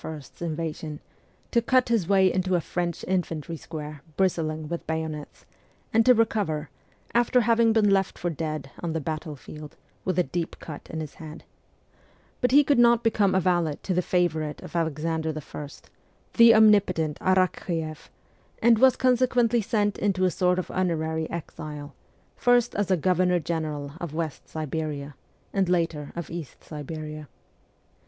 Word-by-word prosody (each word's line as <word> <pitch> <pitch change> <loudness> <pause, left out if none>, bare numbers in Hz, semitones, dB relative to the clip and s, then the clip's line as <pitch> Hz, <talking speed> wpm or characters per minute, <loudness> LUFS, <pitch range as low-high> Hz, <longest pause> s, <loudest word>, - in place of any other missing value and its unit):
's 155 -1 -9
invasion, 160 -2 -4 0.5
to 235 - +3
cut 255 +1 +2
his 225 -8 +1
way 190 -1 +4
into 185 0 +1
a - - +3
French 170 0 -3
infantry 170 -3 -2
square 150 -2 -7 0.2
bristling 160 -5 0
with 170 +2 -5
bayonets, 160 -2 -4 0.5
and 225 +1 +5
to 250 - +8
recover, 195 - 0 0.4
after 240 +1 +3
having 230 0 +4
been 220 -2 +3
left 195 -1 +2
for 175 - -2
dead 155 -3 -4
on 170 -2 -2
the 160 - -1
battle 155 0 -4
field, 150 +2 -11 0.3
with 185 -2 -1
a 180 - +4
deep 165 +4 -3
cut 150 -3 -9
in 160 - -4
his 155 - -7
head; 155 0 -9 1.0
but 250 - +3
he 285 +4 +6
could 280 -3 +2
not 235 -1 +5
become 210 -4 +2
a - - +5
valet 175 -5 +1
to 190 - -1
the 180 - +2
favourite 160 -5 0
of - - -10
Alexander 160 0 -1
I., 150 -1 -6 0.6
the 230 -1 +8
omnipotent 200 -8 +4
Arakch6eff, 175 -4 0 0.5
and 230 -1 +5
was 260 0 +6
consequently 245 -2 +3
sent 205 -1 0
into 195 -2 +1
a 180 - +2
sort 180 0 +2
of 185 - -3
honorary 160 -3 -1
exile, 150 -3 -7 0.4
first 245 -1 +3
as 205 -1 -1
a 185 - +3
governor 180 +1 +2
general 155 -3 -3
of 165 -3 -5
West 160 -3 -4
Siberia, 150 -2 -4 0.4
and 195 -3 +1
later 165 -5 0
of 170 -1 -6
East 165 -6 -7
Siberia. 155 0 -7
170 Hz, 155 wpm, -26 LUFS, 155-200 Hz, 1.0 s, to